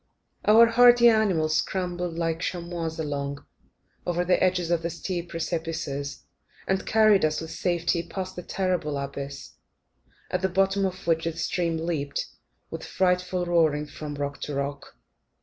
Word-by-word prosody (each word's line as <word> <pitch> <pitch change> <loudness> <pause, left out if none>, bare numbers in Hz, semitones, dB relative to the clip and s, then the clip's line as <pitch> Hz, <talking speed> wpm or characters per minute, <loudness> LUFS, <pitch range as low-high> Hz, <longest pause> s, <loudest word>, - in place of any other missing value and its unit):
Our 225 +2 +8
hardy 240 +1 +7
animals 180 -9 +2
scrambled 180 -2 -2
like 165 -1 -1
chamois 170 -2 -3
along, 140 -2 -4 0.6
over 175 0 -1
the 180 - +2
edges 180 -2 +1
of 170 -1 +2
the 170 - -2
steep 175 0 -4
precipices, 160 -4 -3 0.4
and 190 0 0
carried 215 -2 +5
us 155 0 +1
with 160 0 -7
safety 175 0 0
past 185 +2 -6
the 180 - -5
terrible 180 -6 -1
abyss, 140 0 -6 0.8
at 180 - 0
the 190 - +1
bottom 195 +2 +2
of 185 0 -8
which 165 -1 +1
the 165 - -1
stream 165 0 -1
leapt, 160 -4 -2 0.5
with - - -5
a - - -8
frightful 180 -1 +1
roaring, 160 -4 +2
from 150 0 -7
rock 140 0 -4
to 145 - -4
rock. 140 0 -4
170 Hz, 150 wpm, -26 LUFS, 155-185 Hz, 0.8 s, Our